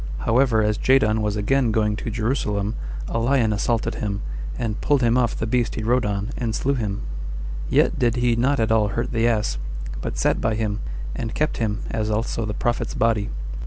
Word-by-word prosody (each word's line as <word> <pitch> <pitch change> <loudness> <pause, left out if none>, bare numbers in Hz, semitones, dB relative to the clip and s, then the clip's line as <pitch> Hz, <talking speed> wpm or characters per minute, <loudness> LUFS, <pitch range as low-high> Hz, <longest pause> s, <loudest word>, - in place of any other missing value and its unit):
However, 115 -2 +3
as 105 0 +1
Jadon 110 -5 +3
was 105 -1 0
again 120 +4 +2
going 105 -1 +1
to - - -4
Jerusalem, 110 -3 -1 0.3
a 115 - -1
lion 120 -2 +2
assaulted 115 +2 0
him, 100 -1 -3 0.3
and 115 -3 -2
pulled 145 -3 +2
him 115 0 +3
off 125 -3 +2
the - - -1
beast 120 +1 0
he 110 - -3
rode 120 +1 +2
on, 100 +3 -2
and 115 -3 -1
slew 140 - +1
him; 105 -5 -2 0.7
yet - - +3
did 120 -1 +2
he 120 -1 +2
not 135 +4 +2
at 110 -1 +2
all 110 -2 +4
hurt 115 +4 -2
the 115 -1 +2
ass, 105 - 0 0.4
but - - -4
sat - - +1
by 110 -1 +1
him, 105 -1 -1 0.4
and 115 -1 -4
kept 155 - 0
him, 110 -1 -1
as 110 -1 -1
also 110 +1 -1
the 105 - -3
prophet's 120 0 -1
body. 110 -3 +1
115 Hz, 200 wpm, -23 LUFS, 105-120 Hz, 0.7 s, all